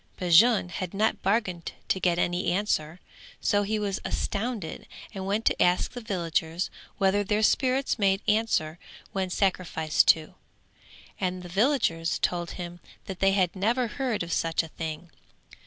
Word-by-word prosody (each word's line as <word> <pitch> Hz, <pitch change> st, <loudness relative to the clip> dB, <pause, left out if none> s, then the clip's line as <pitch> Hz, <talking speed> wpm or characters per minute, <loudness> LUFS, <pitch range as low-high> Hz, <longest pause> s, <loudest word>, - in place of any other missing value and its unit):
Bajun 180 Hz, +3 st, +5 dB
had 180 Hz, +1 st, -5 dB
not 215 Hz, +2 st, +1 dB
bargained 190 Hz, -4 st, -1 dB, 0.2 s
to 190 Hz, -, +1 dB
get 175 Hz, -2 st, +2 dB
any 175 Hz, +1 st, 0 dB
answer, 175 Hz, -4 st, -1 dB, 0.4 s
so 205 Hz, -, +2 dB
he 210 Hz, +2 st, -1 dB
was 205 Hz, -2 st, -2 dB
astounded 210 Hz, -5 st, -3 dB, 0.3 s
and 190 Hz, -1 st, -5 dB
went 210 Hz, +3 st, -1 dB
to -, -, +2 dB
ask 180 Hz, 0 st, +3 dB
the 245 Hz, -, -7 dB
villagers 170 Hz, -4 st, -2 dB, 0.3 s
whether 200 Hz, +1 st, +2 dB
their 210 Hz, +2 st, 0 dB
spirits 260 Hz, +2 st, +2 dB
made 195 Hz, -1 st, +2 dB
answer 210 Hz, -7 st, +1 dB, 0.3 s
when 190 Hz, -1 st, -2 dB
sacrificed 180 Hz, -5 st, +1 dB
to: 160 Hz, -1 st, +3 dB, 0.9 s
and 185 Hz, -1 st, -2 dB
the 175 Hz, -, -9 dB
villagers 195 Hz, -, +1 dB
told 175 Hz, -1 st, -1 dB
him 175 Hz, -1 st, -7 dB, 0.3 s
that 190 Hz, -2 st, -7 dB
they 195 Hz, 0 st, +4 dB
had 185 Hz, -2 st, +1 dB
never 230 Hz, +6 st, +1 dB
heard 245 Hz, -4 st, -2 dB
of 170 Hz, -, -4 dB
such 165 Hz, 0 st, +1 dB
a 165 Hz, -, -9 dB
thing. 160 Hz, +2 st, -6 dB
190 Hz, 155 wpm, -27 LUFS, 175-210 Hz, 0.9 s, Bajun